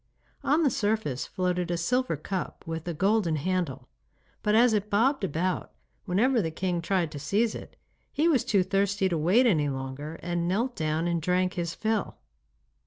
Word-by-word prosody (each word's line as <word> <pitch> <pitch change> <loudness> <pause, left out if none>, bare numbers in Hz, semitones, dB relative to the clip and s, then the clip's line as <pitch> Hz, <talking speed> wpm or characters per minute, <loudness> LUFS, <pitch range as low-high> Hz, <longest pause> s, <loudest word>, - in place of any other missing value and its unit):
On 295 +4 +3
the 280 - +3
surface 205 - -1
floated 180 -2 -1
a 175 - 0
silver 245 - 0
cup 185 +5 -5
with 160 0 -5
a 170 - -1
golden 195 -2 +2
handle, 155 -6 -2 0.5
but 210 0 +2
as 235 0 +5
it 210 0 0
bobbed 230 +5 +2
about 180 +1 -1 0.3
whenever 225 +6 +2
the 165 - -1
king 175 +1 -2
tried 170 -2 0
to 145 - -6
seize 210 +10 +1
it, - - -9 0.4
he 310 +3 +1
was 285 -8 +3
too 195 -3 +2
thirsty 195 +1 +1
to 170 - 0
wait 190 +11 +4
any 155 -11 +3
longer 135 +4 -5
and 175 0 -1
knelt 230 +8 0
down 155 +1 -1
and 170 -1 0
drank 180 +2 +1
his 170 -2 -3
fill. 220 -2 -1
185 Hz, 175 wpm, -27 LUFS, 165-215 Hz, 0.5 s, as